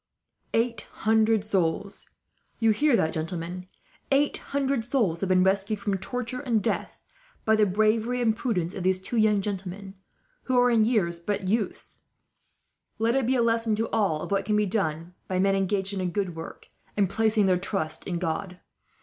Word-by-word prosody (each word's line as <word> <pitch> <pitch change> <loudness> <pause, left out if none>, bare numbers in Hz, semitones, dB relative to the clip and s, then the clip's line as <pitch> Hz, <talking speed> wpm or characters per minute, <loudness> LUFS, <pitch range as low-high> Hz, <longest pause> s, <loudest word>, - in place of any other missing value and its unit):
"Eight 230 -1 0 0.2
hundred 220 -1 +3
souls. 195 0 -1 0.5
You 225 -1 +3
hear 290 +4 +3
that, 160 -7 +1
gentlemen? 170 +3 -4 0.4
Eight 280 +1 +3
hundred 275 -3 -1
souls 225 -9 0
have 195 - -2
been 185 0 +4
rescued, 200 +2 +1
from 200 -1 -1
torture 250 +5 -4
and 235 -7 0
death, - - -2 0.5
by 220 - +4
the 215 -1 +3
bravery 215 +5 +1
and 225 -3 +2
prudence 185 -8 -1
of 190 - -5
these 185 +1 +2
two 190 +6 -4
young 215 -2 +3
gentlemen, 195 -1 -5 0.5
who 255 -1 +1
are 245 0 +4
in 225 -2 +4
years 180 -8 +1
but 190 +2 -3
youths. 215 +2 -2 1.0
Let 225 +2 +1
it 265 -3 +1
be 260 - +2
a 240 - +3
lesson, 230 -1 +1
to 225 +2 0
us - - -20
all, 165 -8 +1
of - - -7
what 195 0 +1
can 210 +2 0
be 210 0 +3
done 175 -4 -2
by 185 - -1
men 195 +1 +3
engaged 195 0 0
in 195 - -2
a 185 - -1
good 180 -1 -2
work, 165 0 -9 0.3
and 200 -2 +3
placing 220 +1 +2
their 185 -2 +3
trust 160 -5 -2
in 175 - -2
God. 180 +2 -3
205 Hz, 185 wpm, -26 LUFS, 185-225 Hz, 1.0 s, been